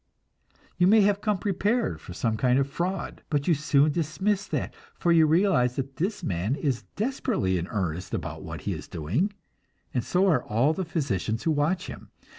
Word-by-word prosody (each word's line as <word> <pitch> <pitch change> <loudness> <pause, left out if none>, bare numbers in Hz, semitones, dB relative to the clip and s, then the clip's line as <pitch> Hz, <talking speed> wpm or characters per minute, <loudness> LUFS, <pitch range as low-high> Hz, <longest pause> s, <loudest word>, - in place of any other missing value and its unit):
You 180 - +4
may 215 +2 +6
have 205 0 +2
come 210 -2 +1
prepared 200 - 0
for - - -10
some 110 +4 0
kind 125 +3 +2
of 135 0 +2
fraud, 175 +6 -3
but 145 -2 0
you 175 - +5
soon 150 0 +3
dismiss 190 +6 -1
that, - - -2 0.2
for 175 - +1
you 165 -2 +6
realize 155 -7 +3
that 135 0 -4
this 195 +6 -2
man 95 +7 -1
is 135 -5 -2
desperately 215 - 0
in 85 - -4
earnest 90 -3 -3
about - - -4
what - - -7
he - - -2
is - - -7
doing, 110 - -1 0.6
and 125 - 0
so 185 - +2
are 175 - +3
all 120 +8 +2
the 190 +2 -3
physicians 120 - -2
who 165 - +2
watch 155 +5 +1
him. - - -9
155 Hz, 190 wpm, -26 LUFS, 120-190 Hz, 0.6 s, may